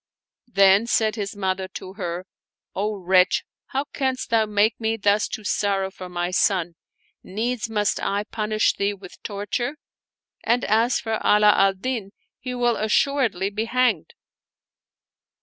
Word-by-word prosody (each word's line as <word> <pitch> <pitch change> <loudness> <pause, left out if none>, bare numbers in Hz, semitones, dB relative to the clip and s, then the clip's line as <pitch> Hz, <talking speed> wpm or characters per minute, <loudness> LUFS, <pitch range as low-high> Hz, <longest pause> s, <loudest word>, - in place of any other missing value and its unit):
Then 200 0 +4
said 220 -2 +1
his 205 -2 -4
mother 190 -1 -2
to 185 - -7
her, 180 -2 -5 0.2
" - - -62
O 210 +2 -1
wretch, 185 -1 +3 0.2
how 275 +1 -1
canst 260 -3 -2
thou 220 -1 +3
make 210 +1 +2
me 220 0 0
thus 205 0 +2
to 215 - -6
sorrow 195 -2 0
for 185 -1 -9
my 175 0 -2
son? 180 -2 +1 0.5
Needs 225 +4 -3
must 210 -2 0
I 200 +1 -1
punish 215 0 0
thee 200 +1 -1
with 185 -2 -14
torture; 210 +7 -3 0.7
and 240 +2 +1
as 225 +4 +2
for 225 -1 -2
Ala 210 0 +6
al 195 -1 +3
Din, 210 -1 -4 0.3
he 250 -1 -5
will 240 -1 +1
assuredly 215 -3 +1
be 215 +2 -2
hanged." 255 +2 0
210 Hz, 150 wpm, -23 LUFS, 195-230 Hz, 0.7 s, Ala